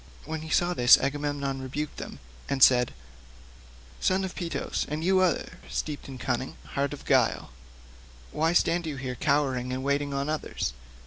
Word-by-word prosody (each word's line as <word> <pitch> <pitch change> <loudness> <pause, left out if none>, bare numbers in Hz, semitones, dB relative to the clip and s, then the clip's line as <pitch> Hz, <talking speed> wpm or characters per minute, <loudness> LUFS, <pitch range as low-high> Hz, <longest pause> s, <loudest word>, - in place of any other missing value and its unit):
When 160 0 -4
he 160 - -8
saw 175 +2 +2
this 125 -6 +7
Agamemnon 140 -1 -2
rebuked 140 +3 -4
them - - -7 0.3
and 135 -2 +3
said, 125 -2 +6 1.1
"Son 190 +1 +2
of 190 - -4
Peteos, 170 -2 -2
and 150 +2 -3
you 190 +2 +4
other, 185 -2 0
steeped 150 -2 -4
in 135 -1 -8
cunning, 130 +1 -2 0.2
heart 140 0 0
of 145 - -8
guile, - - +2 0.8
why 160 - +1
stand 170 -1 +2
you 150 - -3
here 130 -1 -4
cowering 130 -2 0
and 130 +1 -3
waiting 140 +1 0
on 140 +1 -1
others? 155 - -2
145 Hz, 165 wpm, -27 LUFS, 130-160 Hz, 1.1 s, this